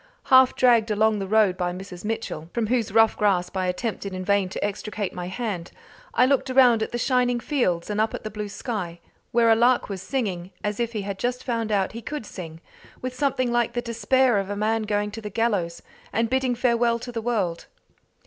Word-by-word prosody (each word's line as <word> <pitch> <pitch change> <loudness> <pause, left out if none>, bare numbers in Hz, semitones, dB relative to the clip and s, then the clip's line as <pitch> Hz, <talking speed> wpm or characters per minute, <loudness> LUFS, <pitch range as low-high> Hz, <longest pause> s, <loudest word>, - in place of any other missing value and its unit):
Half 260 0 +7
dragged 235 -3 +4
along 215 0 +2
the 195 - -3
road 210 -2 +3
by 175 -1 -1
Mrs. 180 -1 -8
Mitchell, 210 -7 -4
from 235 -2 +1
whose 230 -2 0
rough 225 +1 +5
grasp 195 -3 +1
I 185 -1 0
attempted 200 +1 -3
in 185 0 -5
vain 200 -1 +2
to 190 - -3
extricate 205 -1 -4
my 180 -1 -5
hand, 185 -4 -4 0.4
I 250 - +5
looked 270 0 +1
around 250 -3 +5
at 220 - -2
the 240 - -2
shining 245 0 +1
fields 220 - 0
and 210 0 0
up 220 - 0
at - - -7
the 215 - -5
blue 210 0 -5
sky, 195 -6 -4 0.3
where 230 -1 +4
a - - +6
lark 240 +1 +3
was 195 -2 -5
singing 190 -7 -3
as 210 +1 -2
if 235 0 -1
he 210 -3 -3
had 195 -1 -5
just 250 +1 -2
found 230 -3 -2
out 195 -2 +2
that - - -16
he 230 - -6
could 290 0 -5
sing, 165 -5 -9 0.4
with 255 0 -3
something 255 -2 0
like 240 -1 +1
the 240 - -1
despair 240 0 +2
of 195 0 -4
a 205 - -2
man 220 +2 0
going 210 0 0
to 225 +2 -7
the 210 - -5
gallows 200 -6 -1 0.3
and 225 +2 0
bidding 260 -1 +1
farewell 235 -1 +2
to 245 +1 -7
the 230 -1 -3
world. 205 -8 -1
220 Hz, 220 wpm, -24 LUFS, 195-240 Hz, 0.4 s, Half